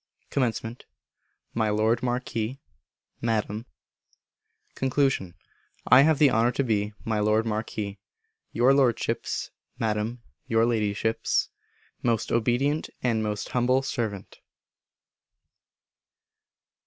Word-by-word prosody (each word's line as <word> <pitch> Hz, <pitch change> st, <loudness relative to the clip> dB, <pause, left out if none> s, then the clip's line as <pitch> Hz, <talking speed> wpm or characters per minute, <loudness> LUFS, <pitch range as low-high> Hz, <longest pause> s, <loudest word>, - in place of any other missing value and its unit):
Comm. 120 Hz, -2 st, -1 dB, 0.7 s
My 110 Hz, -2 st, +1 dB
Lord 110 Hz, +3 st, +2 dB
Marquis 125 Hz, 0 st, -2 dB, 0.6 s
(Madam). 110 Hz, 0 st, -1 dB, 1.1 s
Con. 135 Hz, 0 st, -2 dB, 0.9 s
I 130 Hz, +2 st, +8 dB
have 155 Hz, +1 st, +4 dB
the 145 Hz, -2 st, +5 dB
honour 115 Hz, +2 st, +3 dB
to 140 Hz, -, 0 dB
be, 105 Hz, -3 st, 0 dB
My 110 Hz, -1 st, 0 dB
Lord 105 Hz, +2 st, +2 dB
Marquis, 105 Hz, -2 st, -3 dB, 0.5 s
Your 125 Hz, +4 st, +4 dB
Lordship's 130 Hz, -4 st, 0 dB, 0.3 s
(Madam, 110 Hz, +2 st, -2 dB, 0.2 s
Your 115 Hz, 0 st, +3 dB
Ladyship's) 110 Hz, -1 st, 0 dB, 0.5 s
most 115 Hz, -3 st, 0 dB
obedient 125 Hz, +6 st, +1 dB
and 115 Hz, -3 st, +1 dB
most 105 Hz, -1 st, -3 dB
humble 125 Hz, +2 st, +2 dB
servant. 110 Hz, -7 st, -4 dB
115 Hz, 90 wpm, -26 LUFS, 110-125 Hz, 1.1 s, I